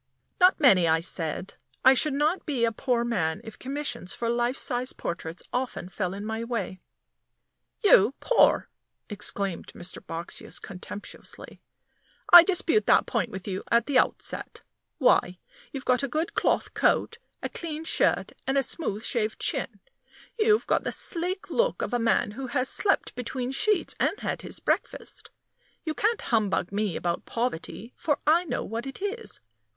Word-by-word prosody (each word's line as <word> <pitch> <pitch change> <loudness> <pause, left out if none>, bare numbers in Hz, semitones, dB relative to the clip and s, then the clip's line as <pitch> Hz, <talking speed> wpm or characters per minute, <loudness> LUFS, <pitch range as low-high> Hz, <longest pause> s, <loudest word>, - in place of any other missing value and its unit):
"Not 365 0 +5
many," 195 - +6
I 160 0 +4
said. 165 +1 -3 0.3
"I 260 - +9
should 275 +2 +2
not 305 +6 +1
be 260 -6 +1
a 230 - +1
poor 240 +1 0
man 185 -10 -1
if 220 - -11
commissions 260 -7 -3
for 235 - -2
life 240 +2 0
size 250 -1 -2
portraits 170 0 -5
often 250 -7 -3
fell 185 0 -3
in 205 +1 -6
my 220 +1 -3
way." 225 -6 -3 1.0
"You 255 - +6
poor!" - - +4 0.4
exclaimed 200 -3 -2
Mr. 175 +1 -6
Boxsious, 165 +1 -7
contemptuously. 195 +2 -9 0.7
"I 350 - +14
dispute 370 +2 +2
that - - +5
point - - -1
with 190 -3 -8
you 190 -1 -3
at 235 0 +3
the 280 -3 +3
outset. - - -2 0.3
Why, - - +3 0.3
you've 270 -1 -6
got 250 +1 +3
a 275 - -1
good 310 +6 -2
cloth - - +1
coat, 460 - +1 0.2
a - - -2
clean 320 -2 -5
shirt, - - +2 0.2
and 270 +1 +1
a 275 - +3
smooth 230 - -1
shaved 220 -2 0
chin. - - -2 0.6
You've 430 0 +4
got - - +2
the - - -3
sleek 360 +2 -2
look - - +1
of - - -4
a 245 - +2
man 230 -2 +2
who 260 +5 -6
has 250 +1 0
slept 395 - +1
between 250 +1 -4
sheets 420 +8 +1
and 415 - +1
had - - -2
his - - -6
breakfast. - - -3 0.5
You 315 - -2
can't 435 +7 0
humbug 205 -7 0
me 205 -4 -1
about 175 -1 -2
poverty, 235 0 -4
for 295 -3 0
I 330 +4 +4
know - - -2
what 230 +5 -5
it 270 - -7
is. 410 +4 -3
245 Hz, 165 wpm, -27 LUFS, 205-305 Hz, 1.0 s, I